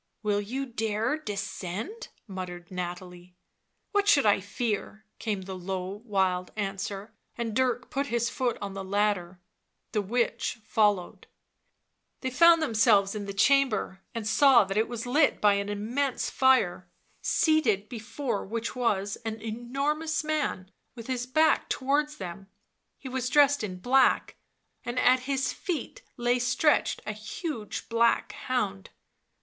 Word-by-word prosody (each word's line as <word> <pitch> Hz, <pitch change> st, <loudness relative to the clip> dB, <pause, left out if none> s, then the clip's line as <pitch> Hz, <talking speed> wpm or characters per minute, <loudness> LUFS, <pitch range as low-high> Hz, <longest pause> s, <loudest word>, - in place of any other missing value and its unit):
" -, -, -50 dB
Will 205 Hz, -1 st, +1 dB
you 255 Hz, +7 st, -3 dB
dare 225 Hz, +1 st, -1 dB
descend?" 210 Hz, -, -5 dB, 0.2 s
muttered 180 Hz, -3 st, -7 dB
Nathalie. 180 Hz, 0 st, -6 dB, 0.3 s
" -, -, -50 dB
What 410 Hz, -1 st, +1 dB
should 285 Hz, -, +5 dB
I 205 Hz, -1 st, +5 dB
fear 215 Hz, +1 st, -3 dB
V 215 Hz, -, -47 dB
came 210 Hz, -4 st, -2 dB
the 190 Hz, +1 st, -7 dB
low, 185 Hz, +2 st, -5 dB
wild 190 Hz, -5 st, 0 dB
answer, 200 Hz, 0 st, -4 dB, 0.2 s
and 230 Hz, -3 st, -3 dB
Dirk 250 Hz, -1 st, 0 dB
put 275 Hz, +1 st, -1 dB
his 235 Hz, -1 st, 0 dB
foot 245 Hz, 0 st, -1 dB
on 200 Hz, -1 st, -4 dB
the 195 Hz, 0 st, -5 dB
ladder... 190 Hz, -2 st, 0 dB, 0.5 s
the 215 Hz, -, +1 dB
witch 235 Hz, +3 st, -1 dB
followed... 205 Hz, -5 st, +1 dB, 0.9 s
they 260 Hz, -, -2 dB
found 335 Hz, +4 st, +6 dB
themselves 215 Hz, -6 st, +3 dB
in 205 Hz, -2 st, -5 dB
the -, -, -3 dB
chamber, 220 Hz, -4 st, +2 dB
and 225 Hz, -2 st, -3 dB
saw 245 Hz, +2 st, +6 dB
that 195 Hz, 0 st, -4 dB
it 220 Hz, +2 st, +2 dB
was 235 Hz, -1 st, -5 dB
lit 285 Hz, +4 st, +3 dB
by 205 Hz, -1 st, +5 dB
an 200 Hz, 0 st, -1 dB
immense 240 Hz, +7 st, -1 dB
fire, 220 Hz, -9 st, +3 dB, 0.3 s
seated 235 Hz, -, +2 dB
before 240 Hz, 0 st, -4 dB
which 230 Hz, +4 st, -4 dB
was 205 Hz, -5 st, 0 dB
an 225 Hz, -1 st, -5 dB
enormous 275 Hz, +9 st, -2 dB
man, 300 Hz, -12 st, -2 dB, 0.2 s
with 230 Hz, -2 st, -9 dB
his 250 Hz, -1 st, -3 dB
back 310 Hz, +4 st, +3 dB
towards 295 Hz, +3 st, 0 dB
them; 190 Hz, +1 st, -7 dB, 0.5 s
he 270 Hz, -, -9 dB
was 255 Hz, -1 st, -2 dB
dressed 285 Hz, -2 st, +4 dB
in 185 Hz, -3 st, -4 dB
black, 255 Hz, +8 st, +3 dB, 0.5 s
and 240 Hz, +1 st, -5 dB
at 255 Hz, 0 st, +5 dB
his 270 Hz, -1 st, 0 dB
feet 355 Hz, -5 st, -4 dB, 0.2 s
lay 245 Hz, 0 st, +1 dB
stretched 250 Hz, +5 st, +2 dB
a 215 Hz, -, -3 dB
huge 255 Hz, -, -5 dB
black 230 Hz, 0 st, +2 dB
hound. 205 Hz, -7 st, -3 dB
225 Hz, 145 wpm, -28 LUFS, 200-260 Hz, 0.9 s, found